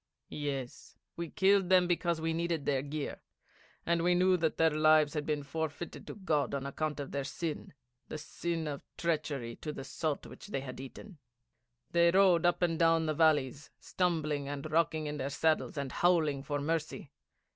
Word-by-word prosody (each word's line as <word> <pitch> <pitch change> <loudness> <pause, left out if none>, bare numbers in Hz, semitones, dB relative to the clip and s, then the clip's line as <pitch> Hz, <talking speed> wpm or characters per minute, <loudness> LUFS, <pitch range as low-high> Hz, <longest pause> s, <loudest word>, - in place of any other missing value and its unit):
'Yes, 140 -4 -5 0.2
we 170 -1 -4
killed 195 0 +3
them 185 -1 +6
because 170 -1 0
we 160 0 -1
needed 165 -3 -1
their 135 -2 +1
gear, 145 +1 -5 0.6
and 170 0 +2
we 175 0 +3
knew 185 +1 +4
that 160 -3 0
their 160 0 +4
lives 155 0 +4
had 150 -2 -3
been 150 -2 -1
forfeited 160 +3 -5
to - - -7
God 155 -8 0
on 140 -1 -3
account 150 +2 -3
of 140 - -5
their 140 -1 -2
sin 155 +3 -4 0.4
the - - -5
sin 165 +1 -3
of 145 -2 -4 0.2
treachery 145 -8 -2
to 150 - -5
the 140 - -7
salt 150 +2 -3
which - - -11
they 135 - -3
had 130 -2 -7
eaten. 145 +7 -10 0.7
They 170 0 +5
rode 180 -2 +5
up 175 +1 +1
and 165 -2 +1
down 165 -1 +4
the 155 - 0
valleys, 145 -3 +2
stumbling 155 -6 -1
and 145 +1 -5
rocking 160 -1 +1
in 150 0 -3
their 135 0 -2
saddles, 155 +2 0
and 140 -2 -3
howling 160 -6 +2
for 145 +1 -3
mercy. 155 -1 -3
155 Hz, 180 wpm, -32 LUFS, 145-170 Hz, 0.7 s, them